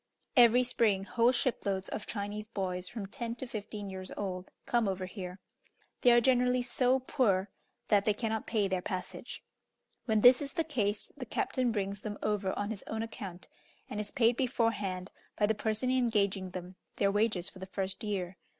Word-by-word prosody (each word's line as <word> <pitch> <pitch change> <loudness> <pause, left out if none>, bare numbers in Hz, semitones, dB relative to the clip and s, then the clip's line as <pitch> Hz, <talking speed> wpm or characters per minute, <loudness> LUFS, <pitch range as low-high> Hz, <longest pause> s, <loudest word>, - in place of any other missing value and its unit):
Every 245 -1 +7
spring, 220 -5 +2
whole 230 +4 +3
shiploads 200 -6 -1
of 210 - -5
Chinese 205 0 -4
boys, 185 -4 -3
from 205 +2 -5
ten 230 +3 -5
to 260 - -5
fifteen 210 -3 -6
years 190 -1 -5
old, 185 -2 -4 0.2
come 235 -3 +2
over 190 -1 -1
here. 185 -1 -7 0.6
They 245 - +6
are 240 - +7
generally 250 0 +3
so 250 +1 +2
poor 210 -7 +1 0.4
that 205 -2 +5
they 210 - +3
cannot 220 -1 -2
pay 210 -3 +1
their 185 -1 -1
passage. 185 -1 -5 0.6
When 220 -3 +2
this 250 +3 +8
is 280 -1 -4
the 330 - +1
case, 215 -10 -1
the 260 -4 -7
captain 250 +2 0
brings 200 -2 -2
them 205 -1 -5
over 205 -2 0
on 205 +1 -1
his 210 - -5
own 220 0 -2
account, 195 -5 -7 0.4
and 210 - -3
is 210 -1 -1
paid 235 -2 +3
beforehand, 210 -7 0 0.3
by 210 - +4
the 220 - +2
person 220 +4 0
engaging 205 -7 +1
them, 180 0 -8 0.2
their 200 - +2
wages 205 -3 +1
for 190 - -8
the 190 - -7
first 190 +3 -3
year. 190 -3 -3
210 Hz, 180 wpm, -32 LUFS, 195-235 Hz, 0.6 s, this